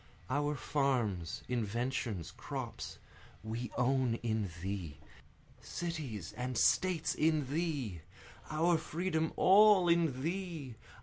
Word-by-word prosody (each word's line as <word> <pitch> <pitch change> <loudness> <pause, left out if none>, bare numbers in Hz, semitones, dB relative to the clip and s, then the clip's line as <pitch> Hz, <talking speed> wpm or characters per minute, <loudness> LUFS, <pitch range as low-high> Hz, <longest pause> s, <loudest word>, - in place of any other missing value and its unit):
Our 145 +2 +1
farms, 125 - 0
inventions, 115 - -2
crops, - - -6 0.5
we 115 +2 -4
own 125 -1 +2
in 110 -4 0
thee! 95 -7 -4 0.6
cities 145 - -4
and 125 0 -3
States 180 -3 +3
in 155 -3 +1
thee! 145 - -2 0.5
Our 165 +2 +3
freedom 160 0 -1
all 200 -1 +7
in 165 -6 +2
thee! 165 -6 -3
135 Hz, 100 wpm, -34 LUFS, 115-165 Hz, 0.6 s, all